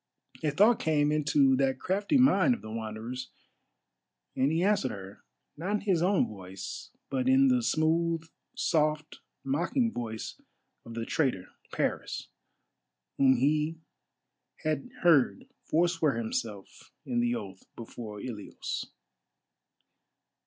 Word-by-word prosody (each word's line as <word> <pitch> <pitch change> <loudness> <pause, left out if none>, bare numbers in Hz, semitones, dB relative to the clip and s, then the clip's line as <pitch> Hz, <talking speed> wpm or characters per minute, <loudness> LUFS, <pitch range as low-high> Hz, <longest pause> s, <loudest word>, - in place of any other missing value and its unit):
A 155 - +1
thought 210 +10 +4
came 150 -2 +2
into 145 -3 +3
that 135 -1 +1
crafty 200 - +1
mind 250 -2 +5
of - - -13
the 110 - -7
Wanderer's, 115 +3 -5 1.1
and 135 +3 +2
he 165 +2 +1
answered 205 +1 +2
her, 95 0 -9 0.3
not 180 +7 -3
in 210 - +2
his 190 -5 +1
own 185 +2 +3
voice, 95 -2 -8 0.2
but 130 -1 +1
in 135 +1 +5
the 125 -1 +3
smooth, 165 +4 +1 0.3
soft, 155 -1 0 0.2
mocking 175 - 0
voice 110 - -5 0.4
of 115 - -9
the 115 -1 -3
traitor, 125 - 0 0.2
Paris, - - -2 0.9
whom 130 -1 +6
he 150 +5 +1 0.9
had 155 - -1
heard 170 - +4 0.2
forswear 165 -3 +2
himself 110 -3 -5
in 120 -2 -1
the 120 0 +1
oath 95 -4 -7
before 110 -2 -8
Ilios. 105 -3 -5
140 Hz, 120 wpm, -29 LUFS, 115-165 Hz, 1.1 s, whom